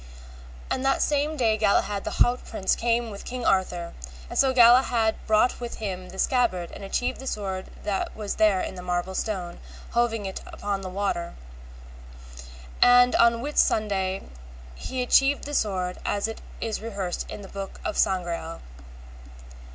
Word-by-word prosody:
And 260 Hz, -, -1 dB
that 270 Hz, 0 st, +2 dB
same 295 Hz, +1 st, 0 dB
day 225 Hz, -4 st, +2 dB
Galahad 205 Hz, -1 st, +1 dB
the -, -, -1 dB, 0.2 s
haut 245 Hz, +1 st, -2 dB
prince 195 Hz, -4 st, 0 dB
came 235 Hz, -1 st, 0 dB
with 200 Hz, -, -8 dB
King 250 Hz, -1 st, -5 dB
Arthur, 180 Hz, -3 st, 0 dB, 0.4 s
and -, -, -1 dB
so 270 Hz, -, +5 dB
Galahad 240 Hz, -2 st, +5 dB
brought 220 Hz, +3 st, +3 dB
with 240 Hz, -1 st, -5 dB
him 185 Hz, -4 st, -5 dB
the 190 Hz, -, -11 dB
scabbard 210 Hz, -9 st, +1 dB
and -, -, -9 dB
achieved 195 Hz, +5 st, -2 dB
the 265 Hz, -, -7 dB
sword 190 Hz, -4 st, -3 dB, 0.2 s
that 200 Hz, -2 st, -2 dB
was 210 Hz, -2 st, -4 dB
there 210 Hz, -4 st, +4 dB
in -, -, -4 dB
the 180 Hz, -, -8 dB
marble 180 Hz, +1 st, -2 dB
stone 185 Hz, -4 st, -3 dB, 0.3 s
hoving 225 Hz, -4 st, 0 dB
upon 195 Hz, +1 st, -4 dB
the 190 Hz, -, -5 dB
water. 185 Hz, -3 st, -2 dB, 1.5 s
And 245 Hz, 0 st, +7 dB
on 235 Hz, 0 st, +4 dB
Whitsunday 200 Hz, -9 st, +1 dB, 0.5 s
he 255 Hz, -, -4 dB
achieved 275 Hz, +3 st, +3 dB
the 290 Hz, -, -6 dB
sword 185 Hz, -7 st, -1 dB
as 205 Hz, +1 st, 0 dB
it 225 Hz, -, -7 dB, 0.2 s
is 220 Hz, -2 st, -2 dB
rehearsed 200 Hz, -5 st, -4 dB
in 205 Hz, -, -7 dB
the -, -, -9 dB
book 195 Hz, 0 st, -7 dB
of -, -, -2 dB
Sangreal. 170 Hz, -3 st, -1 dB
210 Hz, 155 wpm, -26 LUFS, 190-240 Hz, 1.5 s, And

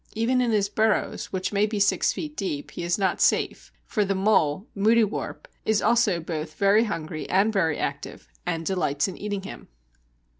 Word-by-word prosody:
Even 245 Hz, +3 st, +2 dB
in 245 Hz, -, +1 dB
his 210 Hz, -3 st, +2 dB
burrows, 220 Hz, +1 st, 0 dB
which 185 Hz, +1 st, -3 dB
may 205 Hz, +1 st, +3 dB
be 210 Hz, -1 st, -3 dB
six 200 Hz, 0 st, +3 dB
feet 300 Hz, -1 st, -6 dB
deep, 150 Hz, -, -4 dB
he -, -, -6 dB
is 175 Hz, 0 st, 0 dB
not 195 Hz, -2 st, 0 dB
safe, -, -, +1 dB
for 210 Hz, -, 0 dB
the 195 Hz, 0 st, -1 dB
mole 190 Hz, -3 st, +2 dB
(moudiewarp) 215 Hz, +1 st, +1 dB, 0.2 s
is 220 Hz, -1 st, +2 dB
also 230 Hz, -7 st, +3 dB
both 160 Hz, -1 st, -5 dB
very 200 Hz, +3 st, +4 dB
hungry 160 Hz, -6 st, -5 dB
and 200 Hz, +4 st, +3 dB
very 165 Hz, -7 st, +1 dB
active, -, -, -5 dB, 0.2 s
and 165 Hz, -, -3 dB
delights 160 Hz, -6 st, 0 dB
in 190 Hz, -, -6 dB
eating 205 Hz, -1 st, -4 dB
him. -, -, -9 dB
200 Hz, 180 wpm, -25 LUFS, 175-215 Hz, 0.2 s, very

